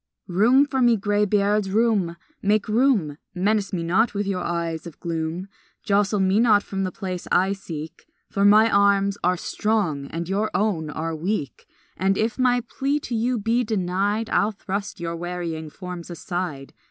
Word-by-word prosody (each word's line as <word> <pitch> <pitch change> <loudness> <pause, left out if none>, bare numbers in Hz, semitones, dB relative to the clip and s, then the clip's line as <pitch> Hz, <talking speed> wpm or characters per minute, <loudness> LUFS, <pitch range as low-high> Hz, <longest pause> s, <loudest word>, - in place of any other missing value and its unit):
Room 230 +10 +4
for 265 -2 -1
me, 240 -2 +5
graybeards, 205 0 +1
room, 200 -5 +1 0.2
make 205 +1 +1
room! 215 - +2 0.2
Menace 200 +2 +1
me 175 -4 -2
not 200 +7 +2
with 205 0 -1
your 190 -2 -2
eyes 170 -1 -3
of 165 - -12
gloom; 165 +2 -3 0.4
Jostle 205 0 +2
me 190 +2 +3
not 215 -3 +4
from 195 -1 -3
the 185 - -2
place 185 -2 -5
I 190 +2 +3
seek, 165 -4 -8 0.2
For 200 - -1
my 210 +2 +7
arms 200 0 +3
are 180 +1 +2
strong 180 -10 -1
and 165 +2 -5
your 205 +3 0
own 185 -7 0
are 160 +2 -3
weak, 165 -2 -3 0.3
And 195 +1 +1
if 225 +4 -1
my 245 -1 +3
plea 275 +4 -1
to 245 - -6
you 240 +2 +1
be 230 +3 +1
denied 205 +1 -1
I'll 215 +1 +2
thrust 200 0 -5
your 170 0 -3
wearying 170 -2 -4
forms 180 +1 -8
aside. 175 -5 -5
195 Hz, 165 wpm, -23 LUFS, 175-215 Hz, 0.4 s, my